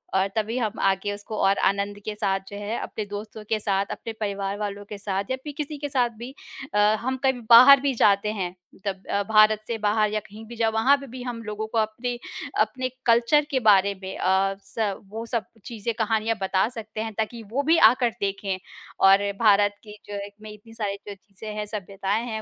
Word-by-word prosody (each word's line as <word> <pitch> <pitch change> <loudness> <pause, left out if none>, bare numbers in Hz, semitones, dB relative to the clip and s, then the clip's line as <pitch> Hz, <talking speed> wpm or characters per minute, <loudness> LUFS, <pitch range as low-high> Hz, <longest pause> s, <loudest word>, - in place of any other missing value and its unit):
और 190 0 +3
तभी 220 +2 -1
हम 220 -3 -2
आगे 195 +1 +1
उसको 205 +1 -7
और 195 +1 +3
आनंद 200 +1 -1
के 215 - -3
साथ 195 -2 0
जो 205 - -7
है 205 +3 -3
अपने 215 - -5
दोस्तों 210 +1 -7
के 220 - +1
साथ, 200 -1 0
अपने 225 - -6
परिवार 200 -2 -3
वालों 205 -1 -4
के 210 - -6
साथ 200 -1 -2
या - - +2
फिर 295 - -6
किसी 300 -1 -4
के 290 0 -4
साथ 250 -3 +2
भी 240 +3 -7 0.4
अ, - - +1 0.2
हम 260 +2 -2
कभी 265 -2 +1
बाहर 255 +4 +10
भी 280 -1 +1
जाते 205 -1 +3
हैं, 185 -4 -4 0.3
तब 190 -1 -3
अ, 200 0 +1
भारत 215 0 +6
से 230 - -2
बाहर 210 0 +1
या 215 - +1
कहीं 210 +2 -12
भी, 235 +2 -10
जब 225 -1 +1
वहाँ 240 +6 +4
पे 275 0 -10
भी 250 0 -8
हम 240 -2 -5
लोगों 215 0 -4
को 225 - -4
अपनी 230 +3 -1 0.4
अपने 255 +4 -1 0.2
कल्चर 235 +6 +4
के 265 - +2
बारे 200 0 +5
में 190 - -6
अ, 190 +1 +2
स 210 -3 -2
वो 225 +2 -6
सब 230 -1 -2 0.2
चीज़ें 230 0 -4
कहानियाँ 220 +1 +1
बता 190 +1 +2
सकते 220 -3 -7
हैं 220 0 -4
ताकि 220 +2 -3
वो 275 +4 0
भी 325 +3 +4
आकर 245 -1 +1
देखें 195 -1 -2 0.5
और 200 +1 +5
भारत 205 -2 +4
की 210 -1 -11
जो 205 - -7
एक 205 - -13
में 215 0 -9
इतनी 210 +2 -14
सारी 210 -3 -3
जो 205 - -5
चीज़ें 200 +2 -10
हैं, 210 0 -3
सभ्यताएँ 205 +1 -3
हैं, 220 -2 -4
215 Hz, 215 wpm, -25 LUFS, 200-230 Hz, 0.5 s, बाहर